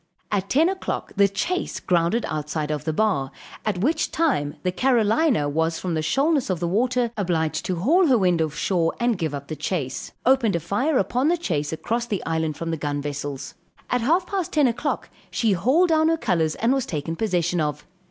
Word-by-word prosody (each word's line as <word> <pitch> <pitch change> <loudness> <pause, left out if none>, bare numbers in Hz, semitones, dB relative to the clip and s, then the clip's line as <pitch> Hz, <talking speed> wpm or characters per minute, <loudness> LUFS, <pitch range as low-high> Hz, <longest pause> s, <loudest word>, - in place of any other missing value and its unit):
At 195 -1 -1
10 310 +5 +4
o'clock, 375 0 -3
the 200 0 +5
chase 200 - -2
grounded 180 +6 +1
outside 155 0 -3
of 150 0 -3
the 160 - 0
bar, 170 -7 +1 0.3
at 210 -4 -1
which 310 +8 +1
time 255 - 0
the 180 - +1
Carolina 235 - +2
was 160 +3 0
from 180 -2 -3
the 160 - 0
shoalness 275 - +1
of 185 -3 0
the 175 - -1
water 240 +5 +1
obliged 160 -5 -1
to 185 - 0
haul 320 - +3
her 260 -4 +5
wind 180 -5 +2
off 155 -2 -1
shore 170 -3 0
and 240 -1 +2
give 160 -5 -2
up 140 0 -7
the 155 - -4
chase; 145 -7 -3
opened 250 -6 +3
a - - +1
fire 230 - 0
upon 245 +8 +1
the 345 +2 +3
chase 155 - -2
across 235 +9 -2
the 200 -5 -3
island 160 -2 -1
from 165 0 -3
the 165 - -2
gun 145 -1 -2
vessels. 145 -1 -5 0.4
At 250 - +2
half 335 +10 +2
past 380 -2 -3
10 300 -2 +4
o'clock, 255 +4 -1 0.2
she 225 -3 +1
hauled 260 - +3
down 315 0 +4
her 325 0 +2
colors 170 - 0
and 235 +3 +2
was 270 -2 -1
taken 160 - -3
possession 175 -4 0
of. 150 -1 -2
190 Hz, 205 wpm, -23 LUFS, 160-255 Hz, 0.4 s, the